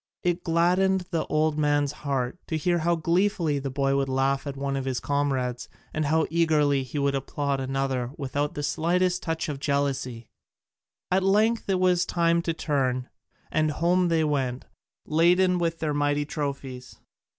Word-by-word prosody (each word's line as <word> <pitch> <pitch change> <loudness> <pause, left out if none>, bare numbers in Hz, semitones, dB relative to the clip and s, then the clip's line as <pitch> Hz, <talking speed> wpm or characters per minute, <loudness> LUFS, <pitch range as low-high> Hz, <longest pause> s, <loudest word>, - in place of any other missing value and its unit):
It 175 0 0
gladdened 180 +3 +2
the 165 -3 -1
old 155 0 +1
man's 145 -1 +2
heart 140 0 -3
to 160 - -1
hear 175 +3 +1
how 170 +1 +2
gleefully 170 -2 +1
the 135 0 -4
boy 135 +1 0
would 135 -1 0
laugh 135 +2 0
at 140 -1 -5
one 140 0 -2
of 135 -1 -3
his 130 -2 -1
comrades 135 -4 -1 0.2
and 155 -1 -1
how 160 +2 +2
eagerly 150 -4 +3
he 130 +3 -6
would 140 -1 +1
applaud 140 0 -2
another 135 -2 -1
without 145 +1 -2
the 145 - -3
slightest 180 +5 +1
touch 165 -1 -2
of 145 -3 -4
jealousy. 135 -5 -1 0.8
At 190 +1 +3
length 210 +4 +2
it 190 -1 +2
was 180 -1 +3
time 170 -1 +2
to 170 - -1
turn, 130 -5 -1 0.4
and 155 0 +2
home 175 +4 +2
they 165 -2 +2
went, 135 -4 -1 0.4
laden 180 +3 +3
with 165 -1 -1
their 155 -2 -1
mighty 145 0 +1
trophies. 140 -4 -5
150 Hz, 165 wpm, -26 LUFS, 135-170 Hz, 0.8 s, eagerly